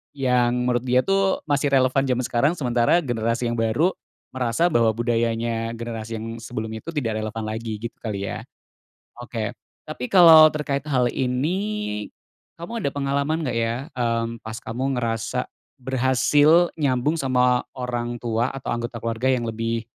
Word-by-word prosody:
yang 125 -2 +1
menurut 120 -1 +1
dia 125 0 +2
tuh 195 0 +1
masih 145 -1 +1
relevan 130 +1 +3
zaman 125 0 0
sekarang, 125 +5 +2
sementara 125 +3 +2
generasi 115 -1 -1
yang 120 - -3
baru, 115 +11 +2 0.4
merasa 130 +7 0
bahwa 115 -5 +3
budayanya 115 0 -1
generasi 115 -1 -6
yang 115 0 -6
sebelumnya 110 -1 -5
itu 165 - -6
tidak 115 -7 -1
relevan 110 +1 -4
lagi, 110 0 -4
gitu 115 0 -6
kali 100 -4 -4
ya? - - -6 0.8
Oke. 115 -3 -4 0.3
Tapi 125 - -6
kalau 165 -4 +9
terkait 145 -2 -2
hal 125 -3 +2
ini, 145 - -2 0.5
kamu 230 +8 -5
ada - - 0
pengalaman 140 +3 -1
nggak 125 - -2
ya, 115 0 0 0.2
mmm, 115 -2 -1
pas 110 0 -7
kamu 130 +3 -3
ngerasa 115 +1 -2 0.3
berhasil 135 +6 +3
nyambung 140 +1 +1
sama 125 -2 +2 0.2
orang 120 -1 -3
tua 115 0 -1
atau 135 -3 -5
anggota 120 0 -4
keluarga 115 +2 -1
yang 130 -2 +1
lebih 115 0 -2
125 Hz, 150 wpm, -23 LUFS, 115-140 Hz, 0.8 s, kalau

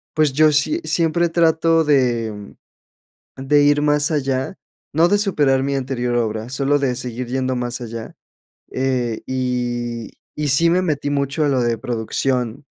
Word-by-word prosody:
pues 155 -3 +2
yo 155 +2 +5
si 150 - +1
siempre 170 0 +1
trato 165 0 +3
de, 125 -7 +1
mm 105 -1 -10 0.8
de 145 +2 +2
ir 145 0 +4
más 150 +1 +2
allá, 135 +2 -1 0.4
no 165 +3 +4
de 205 - +3
superar 150 -10 +2
mi 140 0 -1
anterior 125 -2 -2
obra, 110 0 -2
solo 140 +2 +1
de 135 -3 0
seguir 125 0 -5
yendo 130 0 -1
más 120 0 -3
allá, 115 -1 -7 0.6
eh, 125 -3 -1
y 120 -2 -3 0.3
y 150 -1 -1
sí 165 +5 +3
me 180 +2 +3
metí 145 -4 -1
mucho 140 +2 0
a 145 - +2
lo 130 -2 +1
de 120 -1 +1
producción 125 +2 -2
135 Hz, 160 wpm, -20 LUFS, 120-150 Hz, 0.8 s, yo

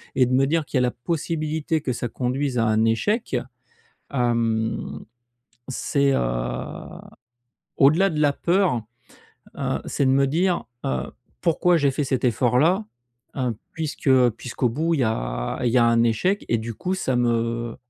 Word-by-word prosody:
et 130 - +4
de 125 - -1
me 135 +1 +4
dire 160 +1 0
qu'il 135 - -2
y - - +4
a - - +2
la 125 -1 +2
possibilité 155 +2 -2
que 130 -4 -2
ça 120 - -3
conduise 130 +2 -2
à 115 - +2
un 110 +1 +2
échec, 205 - 0 0.8
hem, 115 -3 -1 0.6
c'est, 140 +1 +1
heu, - - +2 1.6
au-delà 160 +8 +5
de 155 - -3
la 145 -2 +3
peur, 175 - +1 0.8
heu, - - -1
c'est 140 - 0
de - - +4
me 135 +1 +4
dire, 175 +5 +1 0.2
heu: 65 -1 -2 0.3
«Pourquoi 175 +1 +3
j'ai 145 -3 +3
fait 145 - -1
cet 130 -1 -1
effort-là, 125 - +2 0.5
heu, 125 -4 -1 0.2
puisque 155 -3 -2 0.2
puisqu'au 120 +2 -2
bout 160 +7 0
il 150 - 0
y 125 - +3
a - - -2
il 120 - +2
y 125 - +4
a 120 - +5
un 115 0 +4
échec?» 150 - +1
et 115 - +2
du 115 +1 -5
coup, 185 - -2
ça 135 -8 -1
me, 115 -1 0
130 Hz, 170 wpm, -23 LUFS, 115-155 Hz, 1.6 s, au-delà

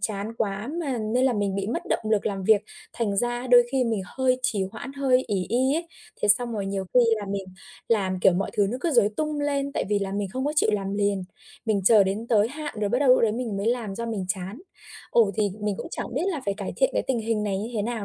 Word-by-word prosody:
chán 205 +1 -3
quá 210 +1 -2
mà, 275 -7 -2
nên 225 +4 0
là 260 - +3
mình 205 -2 -1
bị 195 0 -2
mất 230 - -2
động - - +2
lực 210 -2 +2
làm 195 -2 -2
việc, 215 0 +5 0.3
thành 210 -4 -1
ra 240 +3 -1
đôi 245 -1 +7
khi 265 -2 +2
mình 225 -4 0
hơi 255 +2 +1
trì 200 -4 +1
hoãn, 245 +4 -7
hơi 265 -2 +2
ỷ 190 -5 -1
y 260 +5 +2
ấy. 335 +1 -2 0.4
Thế 210 - +2
xong 240 +3 +4
rồi 205 -3 -3
nhiều 195 -1 -2
khi 250 - +7 0.2
là 205 -2 -5
mình 200 -1 -2 0.4
làm, 190 -5 +1
kiểu, 190 - +5
mọi 195 +3 -1
thứ 205 - +3
nó 250 - -3
cứ 340 - 0
rối 235 -8 +4
tung 305 -1 -1
lên, 280 -1 -1
tại - - -1
vì 205 - +2
là 195 -1 -3
mình 200 -1 -2
không 260 +1 -2
có 295 - 0
chịu 220 - +4
làm 195 -1 -1
liền, 200 -1 0 0.4
mình 215 -3 +2
chờ 210 0 +7
đến 200 +4 -2
tới 215 -1 +3
hạn 295 +1 -6
rồi 205 - +1
bắt 245 - +1
đầu 280 -1 +2
lúc 255 - +6
đấy 220 -2 +3
mình 230 -3 -3
mới 200 - -2
làm 230 -4 -1
do 235 +3 -4
mình 210 -5 -3
chán. 190 +4 -3 0.5
Ồ, 225 -4 +4
thì 210 -2 +1
mình 210 -2 -1
cũng - - -6
chẳng - - -5
biết 295 +6 0
là 345 -7 -1
phải 200 - 0
cải 200 -2 -5
thiện - - +3
cái - - +1
tình 260 -3 0
hình 220 -1 -1
này 195 -2 -1
như 220 +4 -4
thế 210 - 0
nào 225 -1 -3
220 Hz, 275 wpm, -25 LUFS, 200-250 Hz, 0.5 s, đôi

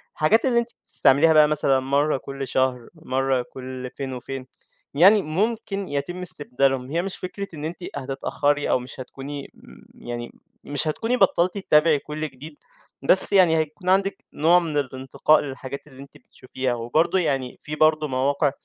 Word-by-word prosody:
الحاجات 210 - +2
اللي 245 -3 +3
أنتِ 235 0 -3 0.2
بتستعمليها 155 +4 +4
بقى 155 -1 +6
مثلًا 145 -3 +1
مرّة 140 +2 +1
كل 135 0 -7
شهر 130 -2 -1
مرّة 135 -4 -1
كل 130 -1 -7
فين 135 -2 -5
وفين 130 +1 -7 0.5
يعني، 195 +8 +6
مُمكن 200 +3 -2
يتم 145 +6 -4
استبدالهم. 135 -5 -1
هي 170 +2 0
مش 195 +1 -6
فكرة 200 +2 -6
إن 150 -1 -6
أنتِ 165 +2 -5 0.2
هتتأخري 145 +2 -1
أو - - +2
مش 125 +1 -11
هتكوني 140 +2 -8
م - - -17 0.3
يعني 120 0 -5 0.3
مش 145 +2 -3
هتكوني 225 +10 -1
بطلتِ 185 -1 +2
تتابعي 155 -5 +3
كل 155 +2 -5
جديد، 145 +3 -13 0.5
بس 190 +8 +8
يعني 180 -4 +5
هيكون 160 +4 -3
عندِك 195 +1 +1
نوع 170 +4 +4
من 160 -4 -3
الانتقاء 135 +2 +1
للحاجات 140 +1 -7
اللي 135 -2 -14
أنتِ 140 0 -14
بتشوفيها 130 0 -5
وبرضه 135 +11 +1
يعني، 135 -7 -2
في 150 - -6
برضه 155 0 +2
مواقع 140 +2 0
145 Hz, 160 wpm, -23 LUFS, 135-165 Hz, 0.5 s, بس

